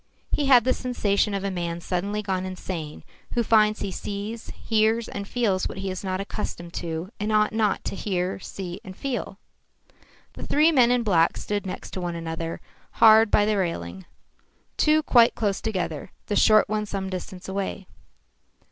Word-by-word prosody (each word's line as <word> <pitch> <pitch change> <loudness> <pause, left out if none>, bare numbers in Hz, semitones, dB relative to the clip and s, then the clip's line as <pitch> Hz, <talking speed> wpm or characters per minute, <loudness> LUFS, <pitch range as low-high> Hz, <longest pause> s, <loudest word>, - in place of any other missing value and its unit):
He 290 - +1
had 250 -4 +7
the 255 +2 +2
sensation 210 -5 0
of 195 - -3
a 200 - -1
man 170 -2 -3
suddenly 200 +5 -2
gone 190 -2 -1
insane, 180 -4 -6 0.3
who 240 - +2
finds 215 -1 +3
he 200 - -2
sees, 205 +4 -5
hears 220 +1 +1
and 200 0 -6
feels 205 -6 0
what - - -8
he 195 0 -3
is 185 - -6
not 185 -1 -2
accustomed 175 -4 -5
to, 165 +3 -4
and 210 +1 -1
ought 215 0 +3
not 215 -2 0
hear, 185 -2 -2
see 185 0 -7
and 190 -3 -10
feel. 245 -7 -4 1.0
The - - -8
three 305 +3 +4
men 250 -6 +5
in 245 -1 +2
black 170 -6 +3
stood 205 -1 -3
next 185 - -6
to 185 - -5
one 175 -1 -3
another 165 0 -4 0.3
hard 220 0 +7
by 205 - +4
the 210 -1 +1
railing, 95 - -3 0.7
two 310 0 +3
quite 235 -5 +5
close 200 -3 -1
together, 185 -9 -3 0.2
the 205 - -2
short 215 0 +5
one 210 0 -2
some 195 -1 -3
distance 185 0 -6
away. 195 0 -3
200 Hz, 175 wpm, -25 LUFS, 185-220 Hz, 1.0 s, had